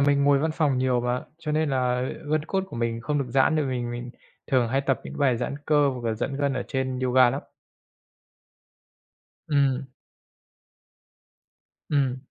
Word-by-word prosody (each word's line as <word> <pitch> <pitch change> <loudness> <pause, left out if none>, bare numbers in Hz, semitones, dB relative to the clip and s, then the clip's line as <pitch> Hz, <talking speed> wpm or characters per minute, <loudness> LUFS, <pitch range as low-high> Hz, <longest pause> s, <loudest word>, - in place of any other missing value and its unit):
mình 140 0 +3
ngồi 140 -1 +5
văn 160 +3 0
phòng 145 -6 +2
nhiều 130 -1 +2
mà, 125 +1 -1
cho 155 -2 -4
nên 155 -1 +1
là 125 -1 +1 0.3
gân 155 -1 +1
cốt 190 +2 -1
của 190 - -9
mình 115 0 -1
không 145 +4 -1
được 140 - 0
giãn 135 +5 +3
được, 150 - +1
mình 125 -2 -2
mình 120 +1 -5 0.4
thường 125 -3 +2
hay 135 +3 +1
tập 135 -1 0
những - - -8
bài 130 -4 +3
giãn 125 +3 -3
cơ 145 -2 +4
hoặc 125 -3 -4
là 110 - 0
giãn 135 +5 -3
gân 140 -1 0
ở 130 - -1
trên 130 -1 -2
yoga 130 -1 +5
lắm. 135 - -4 2.1
Ừm. 140 -3 +1 2.0
Ừm. 135 -4 +1
135 Hz, 175 wpm, -25 LUFS, 125-145 Hz, 2.1 s, ngồi